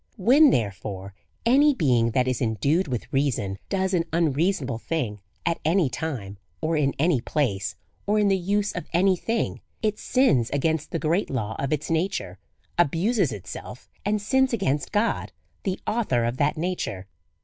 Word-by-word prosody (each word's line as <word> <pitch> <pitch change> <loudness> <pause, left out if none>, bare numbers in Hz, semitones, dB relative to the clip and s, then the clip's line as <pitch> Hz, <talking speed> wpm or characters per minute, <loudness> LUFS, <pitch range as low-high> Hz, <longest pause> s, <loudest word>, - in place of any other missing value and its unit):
When, 270 +9 +6
therefore, 100 - -2 0.3
any 280 +4 +5
being 125 - +3
that 125 +2 +1
is 130 -1 -1
endued 140 - +1
with 125 -4 -4
reason 115 -9 0
does 190 0 0
an 170 -2 +2
unreasonable 155 - +1
thing 120 -9 -2 0.3
at 170 - 0
any 165 -3 +2
time, 110 -12 -4 0.2
or 160 +1 0
in 140 -3 +1
any 155 -4 +2
place, 100 - -1 0.3
or 210 +1 +3
in 210 -1 +3
the 195 - +4
use 200 +3 0
of 180 -4 -6
any 185 +2 +4
thing, 225 +5 -2 0.2
it 215 -1 0
sins 145 - +2
against 160 +2 0
the - - -2
great 165 +5 0
law 110 -4 -2
of 135 - -2
its 150 +1 -1
nature, 180 +5 -1 0.4
abuses 175 - +2
itself, 100 +5 -8 0.2
and 210 +1 +1
sins 265 +5 +2
against 150 -10 0
God, 105 - 0 0.3
the 190 -1 -1
author 200 - +1
of 120 +2 -1
that 145 +2 +1
nature. 160 - -3
155 Hz, 160 wpm, -25 LUFS, 120-195 Hz, 0.4 s, When